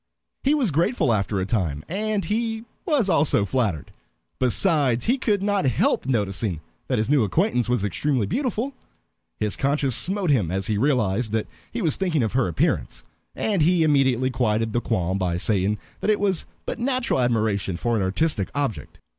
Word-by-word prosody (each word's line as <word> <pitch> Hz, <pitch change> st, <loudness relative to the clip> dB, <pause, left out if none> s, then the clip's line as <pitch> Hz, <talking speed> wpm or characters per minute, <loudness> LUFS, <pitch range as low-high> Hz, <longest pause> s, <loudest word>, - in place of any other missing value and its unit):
He 280 Hz, +3 st, +3 dB
was 255 Hz, -, +1 dB
grateful 165 Hz, -, +1 dB
after 100 Hz, -1 st, 0 dB
a 95 Hz, -, -1 dB
time, 85 Hz, -10 st, -2 dB
and 210 Hz, +2 st, -1 dB
he 225 Hz, +1 st, -2 dB, 0.2 s
was 290 Hz, -, +2 dB
also 145 Hz, -, +3 dB
flattered. 105 Hz, -, -1 dB, 0.5 s
Besides, 130 Hz, -, +2 dB
he 250 Hz, +4 st, +2 dB
could 205 Hz, -5 st, 0 dB
not 200 Hz, -3 st, +1 dB
help 125 Hz, 0 st, +1 dB
noticing 100 Hz, -, -1 dB, 0.3 s
that -, -, 0 dB
his 110 Hz, -, 0 dB
new 140 Hz, -4 st, +3 dB
acquaintance 125 Hz, -, +1 dB
was 125 Hz, -5 st, +1 dB
extremely 130 Hz, +2 st, 0 dB
beautiful. 255 Hz, -, -2 dB, 0.7 s
His 105 Hz, -1 st, 0 dB
conscience 140 Hz, -2 st, +1 dB
smote 185 Hz, -, +1 dB
him 105 Hz, -, +2 dB
as 95 Hz, +2 st, -2 dB
he 110 Hz, -, 0 dB
realized 115 Hz, -5 st, +1 dB
that 110 Hz, -1 st, 0 dB, 0.3 s
he 235 Hz, -2 st, -3 dB
was 160 Hz, -, +2 dB
thinking 170 Hz, -8 st, +1 dB
of 110 Hz, -, -2 dB
her 130 Hz, -5 st, +2 dB
appearance, 85 Hz, -, -1 dB, 0.3 s
and 205 Hz, -6 st, 0 dB
he 170 Hz, +2 st, +4 dB
immediately 130 Hz, -4 st, +2 dB
quieted 115 Hz, -2 st, 0 dB
the 120 Hz, -, +1 dB
qualm 95 Hz, -5 st, -1 dB
by 90 Hz, -2 st, 0 dB
saying 100 Hz, +2 st, 0 dB, 0.2 s
that -, -, -1 dB
it 210 Hz, -, +3 dB
was 195 Hz, -4 st, 0 dB, 0.2 s
but -, -, -4 dB
natural 255 Hz, -, 0 dB
admiration 110 Hz, -6 st, 0 dB
for 120 Hz, +6 st, 0 dB
an 110 Hz, -, +1 dB
artistic 100 Hz, -, 0 dB
object. 140 Hz, -6 st, -3 dB
130 Hz, 175 wpm, -24 LUFS, -, 0.7 s, he